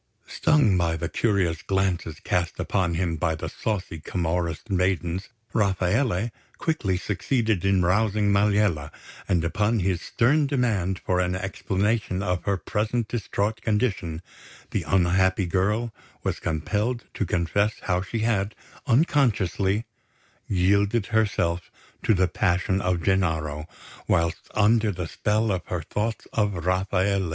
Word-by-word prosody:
Stung 150 - +3
by 80 -1 +1
the 85 - -2
curious 95 -6 0
glances 95 -5 -1
cast 85 -1 -1
upon 90 -4 0
him 85 -1 -1
by 80 -1 0
the 80 +1 -5
saucy 90 -2 -3
Camorrist 85 +3 -2
maidens, 90 0 0 0.2
Rafaele 100 +2 +1 0.3
quickly 105 - 0
succeeded 110 0 0
in 95 -2 +3
rousing 105 +2 +2
Maliella; 100 -7 +2 0.4
and 85 -4 +2
upon 105 +6 +1
his 90 -1 0
stern 140 - +2
demand 110 -9 0
for 90 -1 -1
an 90 0 0
explanation 100 +1 -1
of 90 -2 -1
her 100 -1 +1
present 110 +5 -1
distraught 110 -1 -2
condition, 100 -7 -1 0.5
the - - 0
unhappy 95 +1 +3
girl 105 +6 0 0.3
was - - -1
compelled 105 +9 -1
to - - -1
confess 90 +4 +1
how 90 -1 +1
she 110 +4 -3
had, 105 -2 0 0.3
unconsciously, 115 - +2 0.6
yielded 100 +3 +2
herself 100 -6 +1 0.3
to 110 - +3
the 95 0 +3
passion 95 +1 +1
of 90 -3 0
Gennaro 80 -5 0 0.4
whilst 85 0 0
under 110 +1 +4
the 90 -3 -4
spell 105 +5 0
of 95 -2 -1
her 90 -3 -3
thoughts 110 +7 -3
of 100 -6 0
Rafaele. 95 0 +1
95 Hz, 130 wpm, -25 LUFS, 90-105 Hz, 0.6 s, under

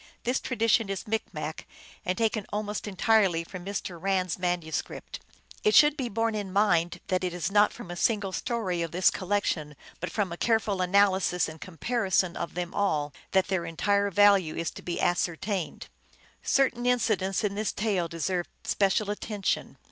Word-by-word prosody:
This 250 +2 +1
tradition 230 -3 +1
is 195 - -3
Micmac, 160 -8 -4 0.4
and 185 - -1
taken 220 -2 0
almost 210 0 -3
entirely 195 -3 +3
from 180 +1 -9
Mr. 185 -3 -5
Rand 190 -1 +1
s 175 - -3
manuscript. 175 -3 -3 0.4
It 430 - +4
should 295 -1 +7
be 260 -5 -3
borne 225 +1 0
in 205 -3 -4
mind 175 -4 +2
that 185 0 +1
it 180 -1 -2
is 175 +2 -2
not 210 +1 +5
from 175 - -9
a - - -5
single 205 0 +1
story 185 -3 -2
of 165 - -2
this 180 +3 +3
collection, 185 -6 -1 0.2
but 180 - -3
from 205 -5 -1
a 170 - -5
careful 220 -4 +1
analysis 190 -1 +3
and 160 -1 -10
comparison 185 - 0
of 170 - -5
them 175 0 -3
all, 150 -8 0 0.2
that 190 0 +3
their 190 -3 0
entire 200 +5 +1
value 200 -4 +4
is 165 +1 -2
to - - -10
be 175 - -4
as 175 - +2
certained. 180 +1 -3 0.5
Certain 250 -3 +1
incidents 215 -5 +1
in 205 -2 0
this 210 +1 -1
tale 200 -5 0
deserve 175 +2 -2 0.2
special 200 +1 +1
attention. 210 -1 -2
195 Hz, 170 wpm, -28 LUFS, 175-210 Hz, 0.5 s, should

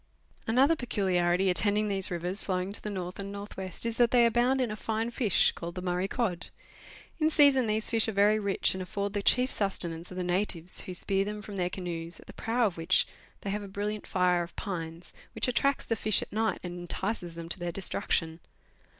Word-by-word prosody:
Another 265 +8 +4
peculiarity 190 - +1
attending 210 +3 +3
these 195 -2 0
rivers 180 +3 -2
flowing 185 0 -2
to - - -5
the 210 - -4
north 185 -2 -5
and 200 0 -5
north 200 +1 -8
west 190 +2 -1
is 230 -1 -2
that 240 -1 +5
they 240 -1 +5
abound 240 +3 +3
in 250 -4 0
a - - -3
fine 225 +2 -2
fish, 230 -5 +3
called 170 0 -7
the 180 - -4
Murray 180 +1 0
cod. 195 -6 -2 0.7
1 310 - +3
In - - +4
season, 280 -5 +5
these 215 0 0
fish 225 -1 +2
are - - 0
very 210 +1 +4
rich, 200 -2 +1
and 190 - -5
afford 200 +2 -3
the 205 - -1
chief 250 +5 +4
sustenance 175 -4 -2
of 180 - -9
the 180 - -1
natives, 180 -1 -1
who 185 - -7
spear 195 +2 +1
them 210 +1 -5
from 205 - -8
their 180 -2 0
canoes, 170 -2 -5
at - - -15
the - - -12
prow 235 +1 0
of 190 -5 -1
which 165 +3 +3 0.4
they 200 - -3
have 210 +1 -2
a 200 - -7
brilliant 205 +2 -4
fire 180 -1 +2
of 170 0 -7
pine, 165 -3 -5 0.3
which - - +1
attracts 275 +3 +1
the 225 - 0
fish 215 -1 +3
at - - -12
night, 220 +1 0
and 175 0 -6
entices 175 0 -3
them 165 0 -7
to 170 - -2
their 175 0 -3
destruction. 165 -3 -1
200 Hz, 220 wpm, -29 LUFS, 180-220 Hz, 0.7 s, that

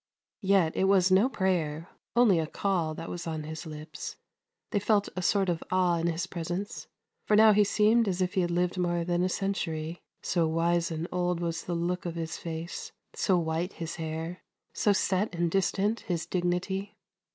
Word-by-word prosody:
Yet 190 -5 +3
it 190 - +2
was 190 -1 +4
no 200 +7 +5
prayer, 170 - -1 0.3
only 225 -8 +5
a 160 - -1
call, 170 -4 -1
that 165 - -6
was 170 -1 -5
on 160 -1 -3
his 160 +2 -6
lips. 155 0 -7 0.6
They 205 - +2
felt 205 0 +2
a 185 - -2
sort 195 +2 +2
of 170 -2 -1
awe 180 -2 +3
in 165 - 0
his 170 +1 -1
presence, 175 +2 -5 0.4
for 210 - +4
now 215 0 +8
he 210 +1 +5
seemed 215 +3 +3
as 185 -1 -1
if 185 0 0
he 190 - +2
had 175 - 0
lived 180 +1 0
more 175 -1 +1
than 175 0 +1
a 185 - +2
century, 170 -4 -2 0.2
so 170 -2 +1
wise 170 +1 +1
and 165 0 -3
old 180 -1 0
was 165 -1 -3
the 175 - -2
look 175 +1 -1
of 170 - -4
his 165 -1 -3
face, 165 0 -6 0.2
so 185 - +2
white 165 +2 -1
his 165 -1 -5
hair, 165 +2 -4 0.3
so 205 - +2
set 190 0 +1
and 170 -1 0
distant 195 +3 +1
his 175 -7 -3
dignity. 190 +3 -2
175 Hz, 190 wpm, -29 LUFS, 165-195 Hz, 0.6 s, now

